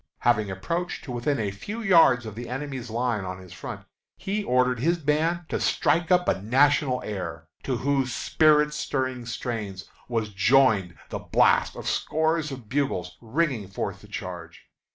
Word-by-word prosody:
Having 110 -4 +2
approached 170 - -3
to 135 - -7
within 125 +4 0
a 105 -3 -1
few 205 - -6
yards 165 - +5
of 110 - -6
the 120 +3 -7
enemy's 130 -2 -5
lines 115 -2 -1
on 95 0 -5
his 95 -1 -12
front, - - -8 0.3
he 205 +2 -2
ordered 125 -4 +2
his 170 +7 +2
band 160 +3 +1
to - - -1
strike 170 +1 +1
up 180 0 +4
a 95 - +1
national 130 +3 +3
air, 85 -6 -5 0.2
to 130 -3 -2
whose 135 +1 0
spirit 150 +3 +3
stirring 130 -4 -2
strains 110 -6 -4 0.2
was 115 -3 -1
joined 105 - +3
the - - -4
blast - - +3
of - - -7
scores 160 -1 0
of 130 -5 -8
bugles 135 -6 -1
ringing 125 - -1
forth 95 - -4
the - - -14
charge. - - -7
125 Hz, 165 wpm, -26 LUFS, 110-150 Hz, 0.3 s, yards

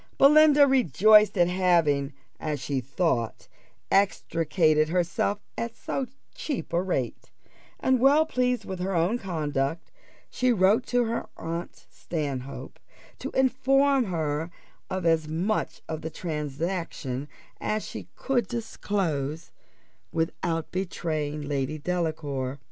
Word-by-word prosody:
Belinda 295 0 +7
rejoiced 215 - +5
at 175 -1 +5
having, 170 -6 +2 0.3
as 150 -2 -2
she 135 0 -2
thought, 130 -3 -1 0.4
extricated 160 -5 +2
herself 175 +3 0 0.2
at 230 0 -4
so 270 - -3 0.3
cheap 315 - -4
a 170 - +3
rate; 135 -10 -3 0.5
and 260 -1 +2
well 285 +5 +5
pleased 250 -5 0
with 190 -1 -5
her 185 +1 -1
own 175 +9 +2
conduct, 155 - -2 0.4
she 250 0 +2
wrote 210 +3 +3
to 245 0 +2
her 230 0 -2
aunt 170 +1 -6
Stanhope, 140 -5 -5 0.4
to - - -4
inform 270 +1 +3
her 160 -3 -2 0.4
of 185 -2 -3
as 165 -2 +3
much 175 +8 -2
of 160 -1 -4
the 160 - -4
transaction 150 -3 -4 0.3
as 215 0 -2
she - - -7
could 260 -3 0
disclose, 165 - -3 0.6
without 165 0 -2
betraying 155 -5 -3
Lady 140 +1 -2
Delacour. 150 -5 -2
170 Hz, 115 wpm, -27 LUFS, 150-220 Hz, 0.6 s, Belinda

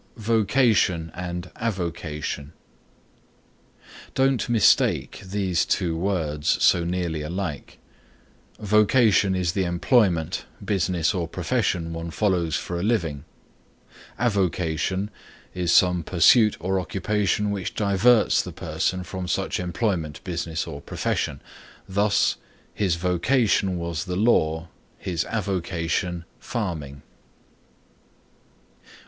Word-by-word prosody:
VOCATION 110 -6 +2
AND 90 0 -5
AVOCATION 85 -8 -4 1.6
Don't 135 -2 +2
mistake 115 -3 +3
these 95 -2 0
two 85 -4 0
words 80 -5 0
so 85 - +5
nearly 85 -3 -2
alike. 85 -1 -5 0.8
Vocation 105 -1 +3
is 90 -2 0
the 95 +1 0
employment, 85 - +1 0.2
business 90 -2 +1
or 90 -4 -2
profession 90 -3 -1
one 85 0 -5
follows 85 -4 0
for 85 -1 -3
a - - -2
living; 85 -10 -1 0.9
avocation 95 -3 0 0.4
is 90 -2 0
some 90 -1 +4
pursuit 95 +6 +4
or 95 +3 0
occupation 105 +2 0
which 100 -3 -4
diverts 105 +3 +4
the - - -7
person 90 0 -2
from 90 +1 -6
such 80 - -1
employment, 90 -4 -2
business 85 -2 -3
or 70 - -7
profession. - - -2 0.5
Thus 100 +2 +2 0.4
"His 95 -5 +1
vocation 95 +2 +1
was 85 0 -3
the 90 -1 -3
law, 80 -6 +2 0.3
his 85 -2 -2
avocation, 90 -3 -2
farming." 80 - -4
90 Hz, 100 wpm, -24 LUFS, 85-105 Hz, 1.6 s, so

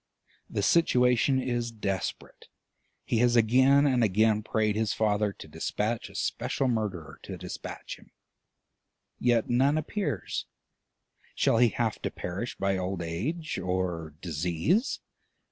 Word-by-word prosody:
The 100 - -2
situation 125 -3 +4
is 120 -2 -1
desperate; 100 -5 -4 0.6
he 115 - +1
has 120 0 +4
again 130 +5 +5
and 130 -4 +3
again 110 +1 +3
prayed 110 -1 0
his 110 -1 0
Father 105 -1 +1
to - - -11
despatch 110 +2 -2
a - - -16
special 135 - -1
murderer 105 -9 -3
to - - -7
despatch - - -7
him, - - -20 1.1
yet 120 -2 +2
none 135 +5 +3
appears: 195 +6 -3 0.9
shall - - +3
he 120 -1 +6
have 115 -1 -2
to - - -1
perish 95 +7 -5
by 95 0 0
old 90 -1 -3
age 135 - -3
or 90 -4 -2
disease? 90 - 0
110 Hz, 130 wpm, -28 LUFS, 95-125 Hz, 1.1 s, he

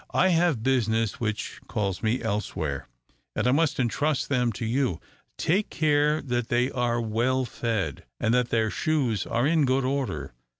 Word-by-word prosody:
"I 190 - +4
have 165 -9 +2
business 115 -4 +1
which 110 -2 -3
calls 100 -4 -2
me 115 +2 0
elsewhere, 85 - -2 0.5
and 105 - 0
I 125 - +4
must 155 0 +2
entrust 140 +4 0
them 125 -3 +2
to 115 - -4
you. 120 - 0 0.4
Take 195 +6 +1
care 150 -1 +2
that 120 -4 -1
they 125 +3 +2
are 120 -2 0
well 120 +4 0
fed, 110 - -3
and 110 - +1
that 125 -1 +2
their 110 -2 +1
shoes 135 - 0
are 120 +3 +1
in 155 0 +3
good 130 0 +2
order. 130 - -2
125 Hz, 165 wpm, -26 LUFS, 110-140 Hz, 0.5 s, I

